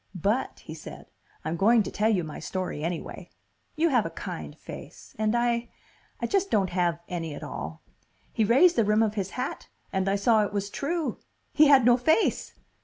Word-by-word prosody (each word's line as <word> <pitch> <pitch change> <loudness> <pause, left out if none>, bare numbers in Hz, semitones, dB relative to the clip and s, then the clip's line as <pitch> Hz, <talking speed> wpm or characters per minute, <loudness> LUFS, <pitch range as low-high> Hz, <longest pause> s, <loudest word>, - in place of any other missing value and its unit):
"But," 205 +8 -1
he - - -9
said, - - -11 0.3
"I'm 160 +1 -1
going 220 +5 +4
to - - -6
tell 215 +1 +1
you 190 -6 +2
my 155 -1 -7
story 180 -3 -4
anyway. 170 0 -5 0.5
You 330 +2 +2
have 245 -6 +3
a - - -4
kind - - -7
face. - - -11
And 215 +1 +1
I 235 0 0 0.5
I - - -1
just 395 -1 +1
don't 195 -3 +1
have 175 -2 +1
any 165 -4 -4
at - - -8
all." - - -6 0.5
He 225 - +2
raised 275 - +5
the 230 - +5
rim 210 +2 +3
of 215 -2 0
his 195 -3 -2
hat 250 - -4 0.2
and 190 0 +1
I 195 - +2
saw 215 +2 +3
it 205 - -4
was 200 0 -2
true! 325 +2 -2 0.3
He 305 0 +6
had 275 -4 +6
no 240 0 +6
face! 315 - +1
215 Hz, 195 wpm, -27 LUFS, 190-245 Hz, 0.5 s, He